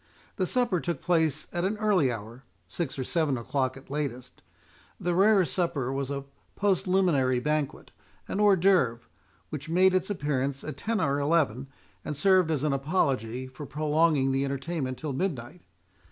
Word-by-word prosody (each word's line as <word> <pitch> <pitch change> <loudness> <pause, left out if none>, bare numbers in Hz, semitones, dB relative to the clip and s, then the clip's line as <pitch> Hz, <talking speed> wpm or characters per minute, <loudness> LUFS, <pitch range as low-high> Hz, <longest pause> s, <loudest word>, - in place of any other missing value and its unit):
The 185 - 0
supper 240 -6 +1
took 170 0 -3
place 160 -4 +1
at 175 - -1
an 200 +3 0
early 200 - +2
hour, 115 +3 -8 0.2
six 165 -6 -4
or 130 - -2
seven 150 -1 0
o'clock 130 +2 -1
at 135 - -14
latest—the 145 +5 -6
rere 195 +1 +5
supper 155 -8 -1
was 135 0 -2
a 140 -1 -3 0.3
postliminary 185 -10 +2
banquet, 150 +1 -2 0.4
a - - -5
hors 205 -2 +6
d'œuvre, 170 -11 +3 0.5
which 150 0 -6
made 185 +3 +4
its 185 +1 +1
appearance 140 -7 -2
at 155 - -6
ten 225 -1 -1
or 140 +1 +1
eleven, 140 -4 +1 0.4
and 150 -2 -5
served 185 +1 +4
as 150 -3 0
an 150 -2 +1
apology 135 - 0
for 130 +3 -9
prolonging 150 -2 +2
the 135 +1 +1
entertainment 135 -1 -3
till 150 -3 -4
midnight. 145 0 -3
150 Hz, 155 wpm, -28 LUFS, 135-180 Hz, 0.5 s, hors